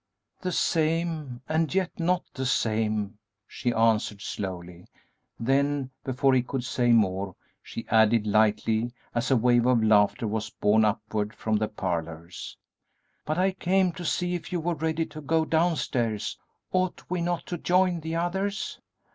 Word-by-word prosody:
"The 185 - -2
same, 160 -6 0
and 160 0 +1
yet 185 -2 -1
not 180 +1 +1
the 130 -1 -2
same," 110 -3 0 0.3
she 120 - -2
answered, 110 -2 +2
slowly; 90 -3 -6 0.5
then, 135 +2 +1
before 135 +1 +2
he 130 - +4
could 125 +1 -4
say 120 -1 +1
more, 95 -4 +2 0.3
she 115 - -7
added, 110 0 +4
lightly, 110 +2 +2 0.2
as 120 +1 -1
a 135 - +4
wave 120 +1 +3
of 120 -3 +4
laughter 105 +1 +4
was 110 +1 -2
borne 110 +1 +3
upward 105 0 -1
from 110 -1 0
the 110 0 0
parlors. 85 -4 -5 0.7
"But 155 +2 -1
I 190 +1 +3
came 185 0 +2
to 175 +1 -8
see 180 +2 0
if 175 - -5
you 180 - 0
were 170 +2 -1
ready 160 0 -1
to 155 - -10
go 160 +2 +1
downstairs; 145 -10 0 0.4
ought 185 -1 0
we 180 -1 -2
not 175 0 -1
to 175 - -4
join 180 0 +2
the 160 +1 -4
others?" 190 +4 -2
125 Hz, 155 wpm, -27 LUFS, 110-165 Hz, 0.7 s, he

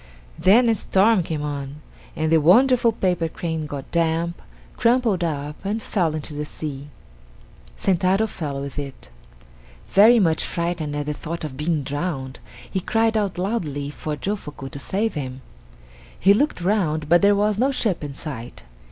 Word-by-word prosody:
Then 210 +8 +5
a 230 - +4
storm 210 0 +3
came 160 -3 -3
on, 145 -1 -5 0.4
and 155 0 -1
the 160 -1 +5
wonderful 235 - +5
paper 180 -6 0
crane 160 -2 -4
got 140 -2 -7
damp, 170 0 0 0.3
crumpled 230 -5 +2
up, 150 -1 -4
and 205 +2 -1
fell 175 -7 -1
into 150 -1 -5
the 150 0 -3
sea. 145 -2 -6 0.9
Sentaro 190 +3 +2
fell 150 -9 -4
with 140 +1 -5
it. 140 - -8 0.8
Very 225 +4 +7
much 165 -5 +2
frightened 170 -4 -2
at 145 0 -2
the 150 - -2
thought 165 +3 -6
of 150 -4 -5
being 150 +1 -1
drowned, 140 -2 -4 0.3
he 190 - -2
cried 225 +4 +1
out 205 -4 0
loudly 160 -8 -2
to 150 0 -5
Jofuku 150 -8 -5
to 140 - -7
save 210 +9 -1
him. 130 -3 -5 0.8
He 195 - +6
looked 270 -2 0
round, 170 -6 0
but 175 +2 +5
there 200 0 +5
was 210 0 +1
no 260 +3 +3
ship 215 - 0
in 140 -2 -6
sight. 125 -6 -7
170 Hz, 160 wpm, -23 LUFS, 150-200 Hz, 0.9 s, Very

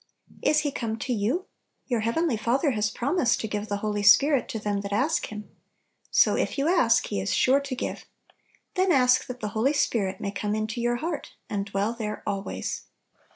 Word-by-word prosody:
Is 305 0 +3
He 290 -1 -1
come 225 -4 -3
to 250 +3 -2
you? 240 - 0 0.4
Tour 240 -3 0
heavenly 235 +6 +1
Father 250 +7 +1
has 210 -3 0
promised 255 +2 +1
to 220 - -3
give 210 0 -3
the 205 - -2
Holy 210 -1 -1
Spirit 275 +7 +5
to 240 - -3
them 205 -2 -2
that 200 0 -6
ask 265 +11 +1
Him. 210 0 -8 0.6
So, - - +4
if - - -1
you 280 +2 +1
ask, 255 -11 +4
He 100 - -2
is 95 - -2
sure 265 +2 +4
to 280 -2 -5
give. - - -5 0.7
Then 375 -1 +2
ask 255 -4 +4
that 250 0 -7
the 210 - -2
Holy 230 +7 +1
Spirit 205 -9 0
may 200 - -3
come 210 +1 -2
into 215 +2 -2
your 240 0 +1
heart, 310 +3 -4 0.2
and 200 -1 -2
dwell 200 +3 -1
there 215 -3 -5
always. 195 -1 -4
230 Hz, 200 wpm, -26 LUFS, 210-275 Hz, 0.7 s, Spirit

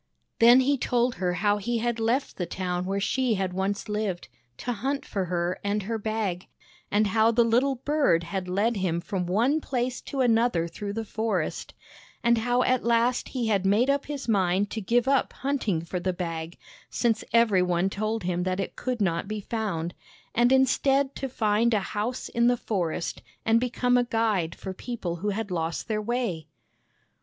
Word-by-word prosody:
" - - -49
Then 240 +3 +8
he 275 +1 +1
told 245 0 +1
her 180 -1 +1
how 205 0 +4
he 235 +4 -1
had 235 0 -1
left 235 +5 0
the 180 - -2
town 180 -1 -2
where 195 +1 -1
she 230 +4 +1
had 190 -2 -2
once 195 +2 -2
lived, 210 -6 -3 0.3
to 245 - -3
hunt 270 +6 -2
for 195 -3 -2
her 175 0 -1
and 205 0 -1
her 225 +3 -3
Bag, 210 -4 -2 0.4
and 210 +1 +3
how 220 +2 +3
the 235 +1 +4
little 250 +4 +2
bird 275 - +2
had 185 +2 -4
led 205 +5 +1
him 175 -3 0
from 180 0 -3
one 240 - +2
place 250 -2 -2
to 275 - -3
another 230 -8 +2
through 200 +4 -6
the 225 +1 -3
forest, 215 -6 -2 0.5
and 235 -1 +4
how 245 +2 +2
at 255 -1 +1
last 235 +1 +2
he 250 -3 -2
had 200 -3 +2
made 215 +8 +3
up 280 0 -1
his 280 -4 -5
mind 195 -1 +2
to 220 - -3
give 240 +5 +1
up 275 -1 +2
hunting 250 - -1
for 180 +2 -3
the 185 +1 -1
Bag, 165 -2 -5 0.3
since 225 -2 0
every 225 -5 +4
one 180 0 +1
told 215 +2 -2
him 175 0 -1
that 185 +1 -1
it 195 - -3
could 250 -3 -3
not 170 -1 0
be 215 +1 -3
found, 190 -7 -3 0.4
and 240 +2 +3
instead 270 +1 +3
to 270 - -4
find 220 0 +2
a - - +3
house 225 +5 -2
in 235 0 +2
the 245 0 +3
forest 175 -7 -2 0.2
and 225 +1 +4
become 245 0 +1
a - - +3
guide 220 -8 0
for 190 - -6
people 190 -5 -4
who 205 +5 -2
had 205 0 -3
lost 165 -1 -2
their 215 -2 -1
way. 210 -9 -2
215 Hz, 190 wpm, -26 LUFS, 185-240 Hz, 0.5 s, Then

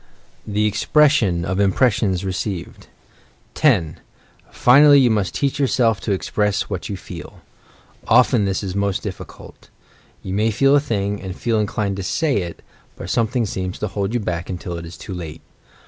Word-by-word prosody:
THE 105 0 0
EXPRESSION 105 - +2
OP 95 +2 -2
IMPRESSIONS 100 -2 +1
RECEIVED 95 -1 -5 0.7
10. 95 - +2 0.5
Finally, 145 +3 +6
you 125 -3 +4
must 105 -3 -1
teach 140 0 -1
yourself 120 -6 +2
to 90 - -2
express 100 +1 -1
what 95 -2 -4
you 100 - -4
feel. - - -10 0.7
Often 110 -5 +4
this 95 +1 -1
is 95 -2 -4
most 100 0 -1
difficult. - - -10 0.5
You 95 - -5
may 105 +3 +1
feel 135 +6 +3
a - - +6
thing, 105 -7 -2
and 95 -1 -6
feel 115 -1 0
inclined 105 -2 -2
to 95 - -4
say 150 - 0
it, 85 -4 -5 0.3
but - - -6
something 115 +1 +1
seems 95 -2 -4
to 105 - -3
hold 100 +3 -3
you - - +1
back 90 -5 -4
until 90 -1 -5
it 85 0 -7
is 80 - -11
too 95 - -8
late. 80 -3 -7
100 Hz, 165 wpm, -20 LUFS, 95-115 Hz, 0.7 s, Finally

